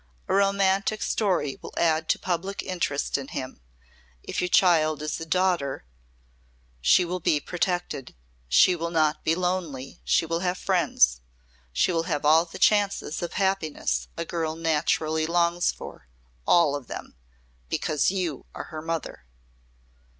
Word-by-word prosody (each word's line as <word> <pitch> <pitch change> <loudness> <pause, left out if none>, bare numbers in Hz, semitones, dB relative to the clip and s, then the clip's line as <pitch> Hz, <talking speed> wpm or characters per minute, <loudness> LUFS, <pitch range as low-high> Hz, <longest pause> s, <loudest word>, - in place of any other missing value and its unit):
A - - -1
romantic 195 +1 +2
story 180 -10 0
will - - -10
add 160 -1 +1
to - - +3
public 190 +2 -3
interest 160 -7 -1
in 135 - -7
him. 130 - -6 0.6
If - - -3
your 180 - 0
child 160 -4 +4
is 155 - -3
a 165 - -7
daughter 170 - 0 1.0
she 180 - +5
will 180 +1 -3
be 155 -3 +2
protected. 175 -4 -3 0.3
She 180 - +5
will 170 0 -3
not 155 -2 +1
be 160 - +2
lonely, 175 -7 -3
she - - +2
will 165 +1 -1
have 180 0 -1
friends. - - +2 0.5
She 65 - +2
will 165 -1 0
have 150 -2 -1
all 160 +3 +5
the 165 - -10
chances 205 -6 +2
of 175 - -4
happiness 190 -6 -1
a 165 - -3
girl 160 -2 -2
naturally 160 -1 0
longs 170 +1 +2
for - - -11 0.4
all 165 -5 +4
of 140 -4 -7
them. - - -8 0.5
Because 150 - +1
you 180 -7 -3
are - - -5
her 155 - -5
mother." 165 - -5
165 Hz, 150 wpm, -26 LUFS, 155-180 Hz, 1.0 s, she